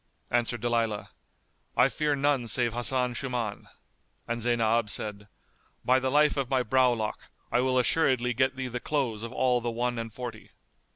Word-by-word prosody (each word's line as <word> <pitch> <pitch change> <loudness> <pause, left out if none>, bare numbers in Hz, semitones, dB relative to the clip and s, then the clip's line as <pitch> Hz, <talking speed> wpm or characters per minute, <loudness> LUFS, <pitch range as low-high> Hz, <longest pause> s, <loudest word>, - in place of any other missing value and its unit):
Answered 120 -1 +1
Dalilah, 115 -3 -1 0.7
"I 125 - +6
fear 150 +1 0
none 140 -3 +1
save 120 0 +1
Hasan 125 +1 0
Shuman;" 120 -5 -4 0.6
and 120 0 -2
Zaynab 115 -2 +2
said, 105 0 -3 0.6
"By 130 +1 +4
the 130 0 -1
life 150 +2 +3
of 135 -3 -1
my 130 -2 +2
browlock, 120 -3 +1 0.2
I 125 - +3
will 130 0 +1
assuredly 125 -1 +2
get 130 +2 +1
thee 130 -1 -3
the 125 0 -4
clothes 125 -7 -1
of 115 +1 -6
all 125 -1 +2
the 120 - -2
one 120 +1 -1
and 115 -1 -5
forty." 120 -1 -8
120 Hz, 165 wpm, -28 LUFS, 115-130 Hz, 0.7 s, I